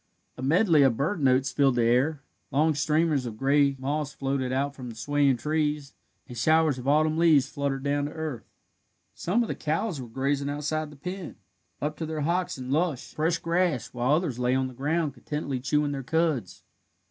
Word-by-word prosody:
A -, -, -9 dB
medley 160 Hz, +3 st, +4 dB
of 130 Hz, -5 st, +4 dB
bird 155 Hz, +5 st, -1 dB
notes 130 Hz, 0 st, +3 dB
filled 135 Hz, -3 st, +3 dB
the 120 Hz, -, +2 dB
air, 135 Hz, +5 st, +2 dB, 0.3 s
long 155 Hz, +3 st, +2 dB
streamers 150 Hz, -2 st, +1 dB
of 110 Hz, -2 st, -7 dB
gray 140 Hz, +2 st, +3 dB
moss 145 Hz, +2 st, -2 dB
floated 135 Hz, -2 st, -2 dB
out 140 Hz, +2 st, 0 dB
from 130 Hz, -3 st, -8 dB
the 115 Hz, -, -9 dB
swaying 140 Hz, +2 st, +2 dB
trees, 150 Hz, +1 st, -1 dB, 0.3 s
and 125 Hz, -, -9 dB
showers 155 Hz, +2 st, +3 dB
of 125 Hz, -, -7 dB
autumn 155 Hz, +2 st, +3 dB
leaves 155 Hz, -5 st, +5 dB
fluttered 140 Hz, -2 st, -3 dB
down 145 Hz, 0 st, 0 dB
to 145 Hz, -, -5 dB
earth. 155 Hz, -7 st, -6 dB, 0.6 s
Some 210 Hz, +8 st, 0 dB
of -, -, -4 dB
the -, -, -2 dB
cows 160 Hz, 0 st, -2 dB
were 125 Hz, -, -8 dB
grazing 140 Hz, +4 st, -1 dB
outside 150 Hz, +1 st, -2 dB
the 150 Hz, -, -13 dB
pen, 180 Hz, +4 st, -6 dB, 0.4 s
up 150 Hz, +1 st, -3 dB
to 160 Hz, -, -4 dB
their 155 Hz, -1 st, -3 dB
hocks 175 Hz, +3 st, 0 dB
in 130 Hz, 0 st, -6 dB
lush, 155 Hz, -3 st, -1 dB
fresh 165 Hz, +2 st, +1 dB
grass, 170 Hz, -7 st, 0 dB
while 125 Hz, +3 st, +1 dB
others 155 Hz, -7 st, -2 dB
lay 125 Hz, +1 st, +2 dB
on 130 Hz, 0 st, +1 dB
the 130 Hz, -, -9 dB
ground 150 Hz, +3 st, -1 dB
contentedly 140 Hz, +1 st, -4 dB
chewing 145 Hz, +3 st, 0 dB
their 140 Hz, -1 st, -3 dB
cuds. 150 Hz, -, -1 dB
145 Hz, 195 wpm, -27 LUFS, 130-155 Hz, 0.6 s, leaves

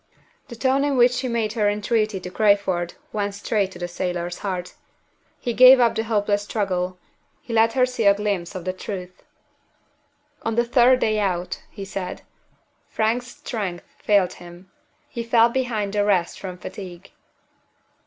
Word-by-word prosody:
The 240 Hz, -, -9 dB
tone 265 Hz, +3 st, +1 dB
in 285 Hz, -2 st, 0 dB
which 245 Hz, 0 st, +6 dB
she 255 Hz, +1 st, -2 dB
made 230 Hz, -3 st, -1 dB
her 210 Hz, -3 st, +2 dB
entreaty 210 Hz, 0 st, 0 dB
to 180 Hz, -, -7 dB
Crayford 195 Hz, -4 st, +1 dB, 0.2 s
went 205 Hz, -1 st, -2 dB
straight 200 Hz, -1 st, -1 dB
to -, -, -10 dB
the 175 Hz, -, -4 dB
sailor's 175 Hz, 0 st, -3 dB
heart. 180 Hz, -3 st, -4 dB, 0.7 s
He 240 Hz, -, -2 dB
gave 255 Hz, +2 st, +8 dB
up 235 Hz, -2 st, +4 dB
the 220 Hz, -, -2 dB
hopeless 205 Hz, -2 st, +1 dB
struggle: 185 Hz, -3 st, -2 dB, 0.4 s
he 235 Hz, -, -8 dB
let 225 Hz, 0 st, +4 dB
her 255 Hz, 0 st, +4 dB
see 250 Hz, -3 st, -3 dB
a 200 Hz, 0 st, +6 dB
glimpse 200 Hz, -4 st, -2 dB
of 185 Hz, -1 st, -6 dB
the 185 Hz, -, -1 dB
truth. 185 Hz, -1 st, -7 dB, 1.2 s
"On 225 Hz, 0 st, -2 dB
the 235 Hz, +1 st, +2 dB
third 245 Hz, +1 st, +4 dB
day 215 Hz, -1 st, +1 dB
out," 180 Hz, -3 st, -2 dB
he 200 Hz, -2 st, -8 dB
said, 190 Hz, -1 st, -6 dB, 0.7 s
"Frank's 230 Hz, +3 st, 0 dB
strength 210 Hz, -12 st, -5 dB
failed 200 Hz, -4 st, +2 dB
him. 175 Hz, +2 st, -14 dB, 0.4 s
He 235 Hz, -, -5 dB
fell 230 Hz, 0 st, +4 dB
behind 235 Hz, -5 st, -2 dB
the 205 Hz, -1 st, +2 dB
rest 190 Hz, -4 st, +1 dB
from 185 Hz, -2 st, -7 dB
fatigue." 180 Hz, -1 st, -9 dB
205 Hz, 165 wpm, -23 LUFS, 185-235 Hz, 1.2 s, gave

